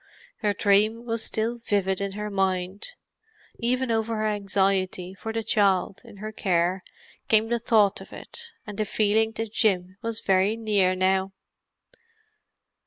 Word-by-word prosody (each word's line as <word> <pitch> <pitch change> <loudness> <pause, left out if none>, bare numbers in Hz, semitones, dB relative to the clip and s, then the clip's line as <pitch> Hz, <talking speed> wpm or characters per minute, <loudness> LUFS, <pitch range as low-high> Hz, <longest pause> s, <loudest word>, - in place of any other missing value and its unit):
Her 210 -2 0
dream 215 +3 +3
was 230 -1 -1
still 230 +2 -2
vivid 200 -4 0
in 200 -1 -2
her 210 +1 -4
mind; 190 0 -1 0.7
even 250 +1 0
over 225 0 0
her 215 - 0
anxiety 195 -3 0
for 220 +3 -6
the 225 0 -2
child 200 -3 +2
in - - -14
her 215 +2 -6
care 185 -2 0 0.4
came 220 0 +4
the 235 0 +1
thought 215 -4 +3
of - - -12
it, 465 0 -8
and 210 -1 -7
the 215 - +1
feeling 220 +2 +2
that 225 -1 -5
Jim 185 -5 +1
was 230 -1 -3
very 195 +3 +2
near 205 -5 +2
now. 190 +1 +1
205 Hz, 150 wpm, -26 LUFS, 190-225 Hz, 0.7 s, came